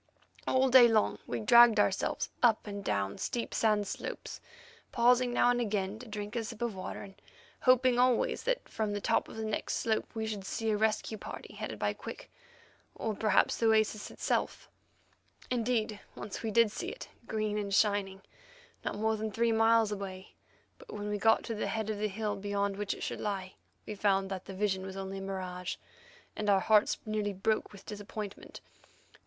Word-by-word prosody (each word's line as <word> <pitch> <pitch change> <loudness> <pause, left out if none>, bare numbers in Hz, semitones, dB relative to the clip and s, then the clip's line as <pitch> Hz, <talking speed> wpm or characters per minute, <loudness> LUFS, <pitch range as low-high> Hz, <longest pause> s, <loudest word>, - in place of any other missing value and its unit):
All 260 +1 +3
day 250 -1 +9
long 220 -2 +2
we 120 -2 -3
dragged 235 - +7
ourselves - - 0
up 230 -3 +4
and 200 -1 -6
down 100 - -1
steep 240 - -3
sand 210 -2 +2
slopes, - - -6 0.5
pausing 245 +1 +4
now 245 0 +4
again 210 -4 -1
to 250 - -10
drink 210 +1 -6
a 230 - 0
sip 225 +1 -6
of 235 -2 -1
water, 185 -1 -6
and 195 -1 -13 0.4
hoping 255 -1 +4
always 250 -1 +2
that - - -1
from 215 -2 -2
the 205 - -2
top - - +1
of - - -10
the 220 0 -4
next 215 -1 -2
slope 220 -1 0
we 220 0 -2
should 210 -3 -4
see 220 +3 -2
a - - +2
rescue 220 0 0
party - - -8
headed - - -5
by - - 0
Quick, - - -9 0.6
or 220 - -2
perhaps 210 -1 +2
the 230 - +2
oasis 220 -1 +2
itself. - - -2 0.8
Indeed, 225 -3 0 0.2
once 205 - -6
we 225 - -2
did 230 0 +4
see - - -4
it, - - -8 0.2
green 215 -1 -1
and 200 -1 -4
shining, 195 -1 +1 0.6
not - - -2
more 220 +1 +1
than 220 0 -3
three 230 +3 +1
miles 225 -1 +4
away, 195 -2 -6 0.5
but - - -13
when 205 0 -4
we 210 0 -2
got 225 +2 +4
to 230 - -4
the 215 - -2
head 220 -1 -2
of 210 - -4
the 215 - +1
hill 210 +1 -2
beyond 200 0 -1
which 205 0 -2
it - - -8
should - - -4
lie 190 -3 -3 0.3
we - - -5
found 195 -1 +1
that 190 -1 -4
the 195 - -8
vision 190 -1 0
was 190 0 -7
only 195 0 -5
a - - -7
mirage, 185 -2 -4 0.6
and 210 -1 -1
our 195 -1 +5
hearts 210 +2 +3
nearly 215 -1 -1
broke 215 +3 0
with 200 -2 -13
disappointment. 210 -1 -7
215 Hz, 190 wpm, -31 LUFS, 200-225 Hz, 0.8 s, day